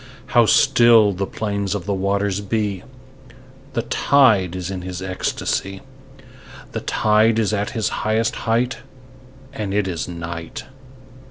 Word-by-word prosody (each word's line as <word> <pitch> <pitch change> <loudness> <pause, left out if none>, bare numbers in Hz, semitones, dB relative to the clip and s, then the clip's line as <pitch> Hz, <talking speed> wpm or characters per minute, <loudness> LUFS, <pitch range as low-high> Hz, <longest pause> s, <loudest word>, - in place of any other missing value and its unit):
How - - +5
still 115 -4 +5
the 95 +1 -3
plains 100 -2 -3
of 95 -4 -5
the 100 - -1
waters 100 +1 -1
be! 100 -2 -2 0.9
The 115 - -1
tide 110 -14 +3
is 90 0 -4
in 95 -2 -5
his 90 0 -6
ecstasy. 95 +1 -3 0.9
The - - -4
tide 110 +1 +2
is 110 -1 +1
at 105 0 -1
his 110 - 0
highest 110 +1 0
height: 120 +3 +1 0.7
And 105 -6 -4
it 105 -2 +1
is 85 -3 -3
night. 85 -1 -7
100 Hz, 135 wpm, -21 LUFS, 95-110 Hz, 0.9 s, How